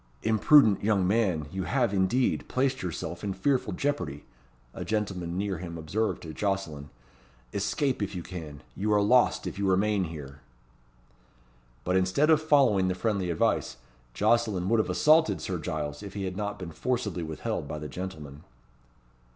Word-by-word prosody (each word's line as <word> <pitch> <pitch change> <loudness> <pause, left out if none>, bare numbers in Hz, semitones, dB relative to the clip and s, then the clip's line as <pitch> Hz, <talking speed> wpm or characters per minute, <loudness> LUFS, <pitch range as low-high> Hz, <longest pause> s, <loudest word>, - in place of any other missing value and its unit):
"Imprudent 110 0 +5
young 100 -3 +2
man, 95 -7 +1
you 95 -1 -3
have, 120 -6 +1
indeed, 100 +7 +1
placed 130 0 0
yourself 85 0 -5
in 100 -2 -2
fearful 130 +2 0
jeopardy," 90 - -2 0.5
a - - -5
gentleman 95 -5 -2
near 100 -3 -2
him 85 -1 -6
observed 100 +8 -2
to 80 -2 -7
Jocelyn. 80 -7 -3 0.6
"Escape, 130 +6 -1
if 100 -1 -3
you 90 - -4
can. 75 -5 -8
You 105 +2 -1
are 105 - +4
lost, 125 +4 +3
if - - -5
you 100 - 0
remain 100 +1 +2
here." 75 -4 -8 1.4
But 90 +1 +1
instead 95 +12 +3
of 155 -1 +5
following 135 -11 +4
the 90 - 0
friendly 100 -2 -1
advice, 85 - 0 0.4
Jocelyn 105 - +2
would 115 0 +3
have 110 - 0
assaulted 160 +1 +4
Sir 90 -2 -3
Giles, 75 -1 -4
if 100 -1 -9
he 100 - -3
had 95 -1 -3
not 105 +1 -3
been 90 -3 -7
forcibly 105 0 -2
withheld 80 -2 -4
by 75 - -5
the 75 0 -6
gentleman. 75 -5 -7
95 Hz, 160 wpm, -28 LUFS, 85-110 Hz, 1.4 s, Imprudent